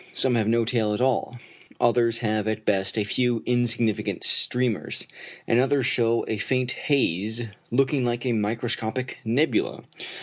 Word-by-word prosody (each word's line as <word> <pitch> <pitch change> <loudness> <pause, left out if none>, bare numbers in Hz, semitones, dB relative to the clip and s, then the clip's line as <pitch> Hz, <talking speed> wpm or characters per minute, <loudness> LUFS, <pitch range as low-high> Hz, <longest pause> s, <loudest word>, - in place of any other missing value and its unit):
Some 130 - +4
have 110 -3 +1
no 115 +1 +2
tail 110 -3 0
at - - -5
all, 125 -1 0 0.4
others 115 -1 +2
have 110 0 0
at 110 0 -3
best 95 0 +1
a 105 - +2
few 120 +2 0
insignificant 120 -3 0
streamers, 125 -4 +1 0.4
and 115 - +2
others 135 0 +2
show 115 -1 +1
a 110 - -2
faint 125 +3 0
haze 110 - 0 0.3
looking 135 +2 +1
like 120 +1 -2
a 125 - +1
microscopic 115 +3 -2
nebula. 155 - 0
120 Hz, 145 wpm, -25 LUFS, 110-125 Hz, 0.4 s, Some